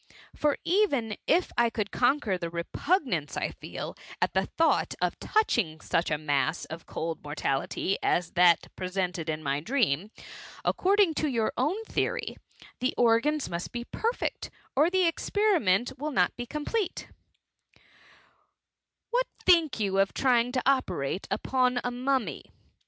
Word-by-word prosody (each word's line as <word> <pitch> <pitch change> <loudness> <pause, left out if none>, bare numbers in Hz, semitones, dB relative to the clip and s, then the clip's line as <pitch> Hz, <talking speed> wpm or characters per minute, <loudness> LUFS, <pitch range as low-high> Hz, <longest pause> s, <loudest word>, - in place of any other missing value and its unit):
— - - -22
^For 295 -1 +2
even 285 - +1
if 345 +3 +3
I 235 -1 +4
could 210 -3 -3
conquer 245 -5 +2
the 170 -2 -4
repugnance 170 - -1
I - - -1
feel - - -7 0.2
at - - 0
the - - +1
thought 325 0 +1
of - - -1
touchhig 220 - 0
such 170 - 0
a 150 - +1
mass 155 +1 0
of 160 +1 -9
oold 165 0 -4
inor* 145 0 -7
tality, 140 +7 -1
M 175 - +2
that 175 -2 +4
presented 180 -3 -2
in 155 0 -3
my 140 0 0
dream, 200 - 0 0.6
according 390 -2 +3
to 310 - +1
your 230 -5 0
own 325 - 0
theory, - - -2 0.4
the 255 - 0
organs 245 +6 +3
most 170 +1 -5
be 240 0 -4
perfect, 460 - -2 0.3
or 300 +5 +4
the 375 0 +2
experiment 330 - +2
wiU 305 +2 -2
not 180 -9 +2
be 245 0 -6
complete* 355 - -3 0.7
^* - - -32 1.3
What - - +1 0.2
think 335 -8 +4
you 195 -2 +1
of 195 0 +2
trying 245 -2 +3
to 255 - 0
operate 185 - 0
upon 250 -1 +1
a 245 - -1
mummy 255 0 -1
240 Hz, 150 wpm, -28 LUFS, -, 1.3 s, I